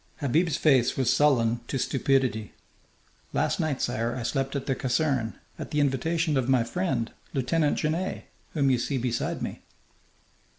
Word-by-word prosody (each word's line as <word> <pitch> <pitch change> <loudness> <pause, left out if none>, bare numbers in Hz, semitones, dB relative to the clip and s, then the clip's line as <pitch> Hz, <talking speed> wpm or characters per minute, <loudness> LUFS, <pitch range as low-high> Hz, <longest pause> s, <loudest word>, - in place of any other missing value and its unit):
Habib's 150 +3 +1
face 130 -5 +3
was 130 -3 +3
sullen 120 -6 +3
to - - -2
stupidity. 130 -5 0 0.8
"Last - - +1
night, 150 -4 -1
sire, 115 +1 -1
I 125 - -4
slept 135 +4 -1
at 140 - -2
the 135 - +1
caserne, 130 -3 0 0.2
at - - -5
the 150 - 0
invitation 150 +3 +1
of 130 -1 0
my 130 -3 +4
friend, 130 -5 -1 0.2
Lieutenant 145 +3 +1
Genet, 165 +5 -2 0.3
whom 140 -4 +2
you 125 - +2
see 135 +3 -1
beside 120 -2 -2
me." - - -5
135 Hz, 155 wpm, -27 LUFS, 120-150 Hz, 0.8 s, my